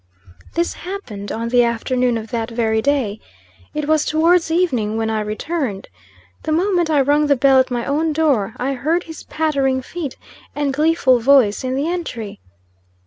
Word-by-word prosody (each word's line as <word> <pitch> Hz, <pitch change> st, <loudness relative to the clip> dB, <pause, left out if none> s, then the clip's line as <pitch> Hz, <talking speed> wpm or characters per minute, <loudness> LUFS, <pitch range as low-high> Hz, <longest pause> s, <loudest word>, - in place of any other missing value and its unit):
This 340 Hz, +1 st, 0 dB
happened 255 Hz, -, -7 dB
on 230 Hz, +1 st, -3 dB
the 245 Hz, 0 st, +4 dB
afternoon 240 Hz, +1 st, 0 dB
of 225 Hz, +1 st, -8 dB
that 230 Hz, -1 st, -2 dB
very 225 Hz, -2 st, 0 dB
day. 235 Hz, -6 st, 0 dB, 0.6 s
It 300 Hz, -1 st, -2 dB
was 310 Hz, -1 st, +3 dB
towards 330 Hz, +2 st, +2 dB
evening 255 Hz, -11 st, 0 dB
when 220 Hz, 0 st, -1 dB
I 215 Hz, -1 st, -1 dB
returned. 215 Hz, -, -3 dB, 0.5 s
The -, -, -3 dB
moment 350 Hz, 0 st, +1 dB
I 295 Hz, -3 st, +3 dB
rung 290 Hz, +2 st, +2 dB
the 285 Hz, -, +4 dB
bell 270 Hz, +1 st, +4 dB
at 260 Hz, -, +2 dB
my 240 Hz, -2 st, -2 dB
own 310 Hz, +3 st, 0 dB
door, 275 Hz, -9 st, +1 dB
I 270 Hz, +2 st, -1 dB
heard 315 Hz, +7 st, 0 dB
his 320 Hz, -1 st, -10 dB
pattering 275 Hz, -4 st, 0 dB
feet 310 Hz, -2 st, -6 dB, 0.4 s
and 290 Hz, -2 st, -1 dB
gleeful 295 Hz, -4 st, +3 dB
voice 245 Hz, -4 st, +4 dB
in 255 Hz, 0 st, -2 dB
the 280 Hz, +4 st, -1 dB
entry. 240 Hz, -, -4 dB
270 Hz, 170 wpm, -19 LUFS, 230-315 Hz, 0.6 s, the